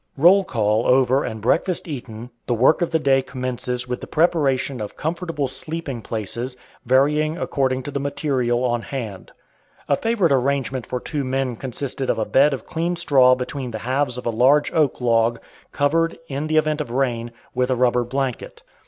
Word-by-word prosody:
Roll 180 +7 +6
call 110 - 0
over 130 +1 +3
and 110 -2 -5
breakfast 165 - 0
eaten, 120 -5 -7 0.2
the 120 - +1
work 130 +9 +4
of 175 - +1
the 165 - +2
day 135 -3 +3
commences 125 -1 -4
with 125 0 -4
the - - -7
preparation 140 -6 +1
of 105 - -7
comfortable 165 -2 -2
sleeping 150 -2 -4
places, 115 +4 -5 0.3
varying 150 +5 +2
according 130 -2 -1
to 145 - -6
the 140 - -2
"material" 135 -4 -1
on 120 -1 0
hand. 115 -7 -6 0.6
A 140 - +3
favorite 215 -4 +1
arrangement 135 -1 0
for 125 - -3
two 145 +2 -3
men 130 -1 -1
consisted 130 +2 -4
of - - +1
a 110 - 0
bed 140 +6 +4
of 135 -5 -4
clean 170 +2 -2
straw 135 -7 +5
between 130 +1 -5
the 110 - -5
halves 130 0 0
of 125 - -7
a 120 - +1
large 130 +6 +3
oak 155 -6 +1
log, 115 -1 +2 0.3
covered, 165 +3 +1
in 140 +1 -3
the 155 0 +1
event 155 0 +1
of 145 - -5
rain, 120 -2 -1 0.2
with 125 0 0
a 130 - +2
rubber 125 0 +2
blanket. 130 0 -4
130 Hz, 180 wpm, -22 LUFS, 125-150 Hz, 0.6 s, Roll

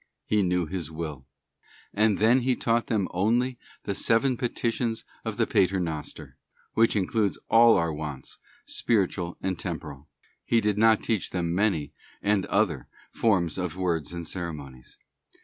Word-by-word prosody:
He 105 -1 +2
knew 90 -2 +1
His 85 -2 -4
will. 75 -5 -6 0.7
He 105 0 +3
then 120 +5 +4
taught 115 0 +1
them 105 -5 0
only 120 +7 +1 0.2
the 100 - -2
seven 115 +6 +2
petitions 115 -1 -2 0.2
of - - -4
the - - +3
Pater 95 +1 +2
Noster, 80 -4 -5 0.4
which 115 0 +3
in 100 -3 +2
clude 105 -2 0 0.2
all 115 0 +7
our 85 -2 0
wants, 75 -3 -7 0.3
spiritual 95 -5 0
and 95 -3 -2
temporal. 80 -5 -6 0.4
He 115 - +2
did 105 -1 0
not 110 -1 +5
teach 110 -5 -1
them 85 -2 -2
many, 95 -6 0 0.3
and 100 -2 +1
other 95 - +1 0.2
forms 95 -6 +1
of 90 -3 -3
words 85 -5 -1
and 85 -1 -5
ceremonies. 75 -8 -7
95 Hz, 150 wpm, -27 LUFS, 85-110 Hz, 0.7 s, all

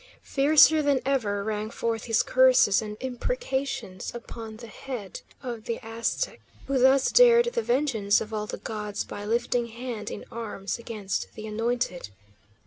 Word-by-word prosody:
Fiercer 305 +2 +5
than 285 -2 +2
ever 215 -7 0
rang 215 0 -3
forth 230 -1 -2
his 225 -2 +2
curses 255 -6 +5
and 210 -1 -6
imprecations 265 - -3
upon 225 -2 -8
the 235 - -10
head 225 -4 -7 0.2
of 235 -4 -6
the 230 - -3
Aztec 230 - -2 0.2
who 275 -1 0
thus 265 +1 +4
dared 475 -1 +7
the 470 - +1
vengeance 240 - +2
of 220 0 -6
all 210 0 -2
the - - -5
gods 210 -2 -4
by 205 - -8
lifting 235 +2 0
hand 235 -1 -6
in - - -7
arms 220 -2 -4
against 215 -4 -4
the 215 - -7
anointed. 225 - -2
235 Hz, 150 wpm, -26 LUFS, 215-265 Hz, 0.2 s, dared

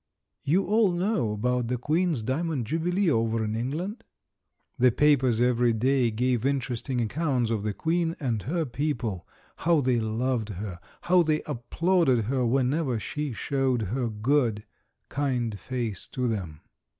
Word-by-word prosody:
You 170 +7 +2
all 215 -2 +3
know 175 - 0
about 125 +3 0
the 125 +1 -1
Queen's 155 0 0
Diamond 140 +1 -1
Jubilee 175 - +1
over 115 -2 +1
in 110 0 -2
England? 170 - -3 0.8
The 125 0 +5
papers 130 -4 +3
every 120 -1 +3
day 125 +2 +2
gave 120 +1 0
interesting 130 -2 -1
accounts 125 0 0
of 110 -3 0
the 105 0 -1
Queen 165 - 0
and 120 -7 -1
her 160 - -1
people, 120 - -3 0.3
how 170 -1 +3
they 125 -3 +2
loved 115 +1 -1
her, 100 -2 -6 0.2
how 180 0 +4
they 155 -2 +1
applauded 145 0 +1
her 130 +2 0
whenever 130 +1 +1
she 145 +8 -4
showed 130 -1 0
her 125 -2 0
good, 110 0 +1 0.4
kind 125 -6 -1
face 120 -7 -4
to 125 -1 -2
them. 90 -9 -4
125 Hz, 145 wpm, -27 LUFS, 115-150 Hz, 0.8 s, The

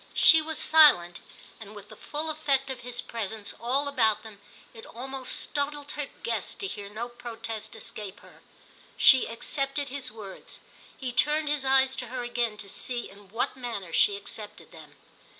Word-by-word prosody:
She 320 -2 +8
was 315 0 -4
silent, 290 - +5 0.4
and 215 -1 -11
with 205 0 -11
the 215 - -11
full 305 +8 -2
effect 280 -3 0
of 260 - -6
his 245 0 -4
presence 220 -2 -5
all 265 +5 +3
about 225 -6 +2
them 215 -2 -12 0.3
it 225 - -12
almost 265 +2 -1
startled 290 0 -2
her 295 -2 -3 0.2
guest 230 -4 -2
to - - -3
hear 200 +1 -6
no 220 +3 -5
protest 230 -3 -7
escape 210 -2 -6
her. - - -18 0.6
She 260 -2 +7
accepted 275 +4 -1
his 270 -3 -4
words, 210 -3 -10 0.4
he 255 -2 -4
turned 300 +3 +2
his 295 -2 0
eyes 265 0 +4
to 250 - -4
her 250 +1 -4
again 240 -2 -2
to 210 -1 -7
see 240 +4 -3
in 200 -1 -16
what 230 +6 -2
manner 230 -9 -6
she 200 - +4
accepted 210 +1 -8
them. - - -14
240 Hz, 170 wpm, -27 LUFS, 215-275 Hz, 0.6 s, She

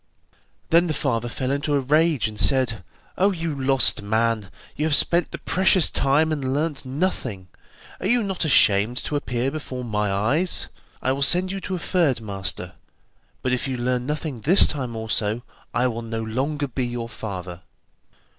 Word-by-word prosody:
Then 170 +2 +4
the 155 - -2
father 120 -4 -1
fell 130 +3 -3
into 145 +1 -1
a - - +2
rage 150 -1 +2
and 105 -1 -6
said: 125 -8 +3 0.4
'Oh, 195 +2 +4
you 165 -4 -3
lost 130 -7 +4
man, 110 0 0 0.3
you 150 - -1
have 155 -2 +4
spent 170 +3 +2
the - - -7
precious 190 -2 +3
time 150 +4 +2
and 135 -3 -2
learnt 150 -1 -2
nothing; 130 - -3 0.5
are 185 - -2
you 240 +2 +2
not 190 -3 -3
ashamed 115 -5 +4
to 150 - -3
appear 125 -2 -2
before 130 -4 -6
my 105 -3 -1
eyes? 130 - +1 0.3
I 130 - +1
will 135 +1 -2
send 180 +6 +4
you 195 0 -5
to 190 +1 -4
a - - -3
third 165 -7 +1
master, 95 -4 -3 0.7
but 130 - 0
if 125 - -1
you 130 -1 -3
learn 125 +1 -1
nothing 150 -5 -4
this 180 - +6
time 130 -6 -3
also, 110 0 -2 0.3
I 120 - +1
will 115 -2 -2
no 115 -1 -4
longer 140 +6 -2
be 130 -1 -3
your 120 -1 -5
father. 95 -6 -7
130 Hz, 175 wpm, -23 LUFS, 115-155 Hz, 0.7 s, this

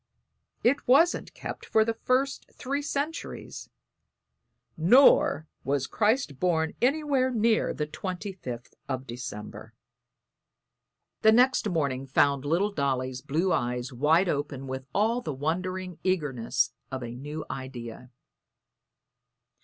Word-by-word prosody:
It 260 +4 +2
wasn't 320 +8 +3
kept - - -7
for 220 -1 +3
the 230 - 0
first 255 +4 0
three 280 +3 -3
centuries, 290 +2 -4 1.1
nor 170 - +5 0.2
was 140 -1 0
Christ 210 - 0
born 160 -3 +1
anywhere 275 0 +2
near 225 -2 +2
the 150 - -2
25th 180 - -6 0.2
of 130 -1 -3
December." 115 -4 -8 1.5
The 220 - +7
next 250 -1 +4
morning 140 -6 -1
found 140 +1 +2
little 175 +8 +1
Dolly's 130 -5 -1
blue 170 +8 0
eyes 125 +2 -2
wide 155 +9 +3
open 140 -3 -2
with 130 0 -6
all 225 +4 +1
the 155 - -4
wondering 180 +4 -3
eagerness 150 -11 0 0.2
of 130 -1 -4
a 120 0 -6
new 150 +4 -6
idea. 125 -2 -7
160 Hz, 115 wpm, -27 LUFS, 130-220 Hz, 1.5 s, The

